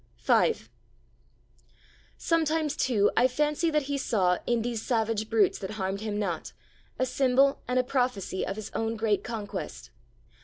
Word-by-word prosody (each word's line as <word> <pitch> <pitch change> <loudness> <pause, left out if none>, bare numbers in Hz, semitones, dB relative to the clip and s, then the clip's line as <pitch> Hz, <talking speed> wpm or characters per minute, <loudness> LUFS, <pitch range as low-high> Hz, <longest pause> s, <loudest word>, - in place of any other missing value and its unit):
V 455 - +3 1.6
Sometimes, 320 -2 +1
too, 220 -8 +2
I 250 - +5
fancy 300 +5 0
that 300 -2 +1
He 280 +1 -2
saw, 185 -8 +1
in 235 -2 +1
these 235 -2 -2
savage 225 -3 -1
brutes 220 -4 +3
that 190 - -5
harmed 195 0 -2
Him 215 -1 -3
not, 180 -6 -3 0.4
a 255 - +1
symbol 270 +1 +2
and 250 - 0
a 255 - +4
prophecy 245 -8 -1
of 195 - -3
His 215 -1 -7
own 225 0 -1
great 215 -2 0
conquest. 205 - -6
230 Hz, 150 wpm, -28 LUFS, 205-270 Hz, 1.6 s, I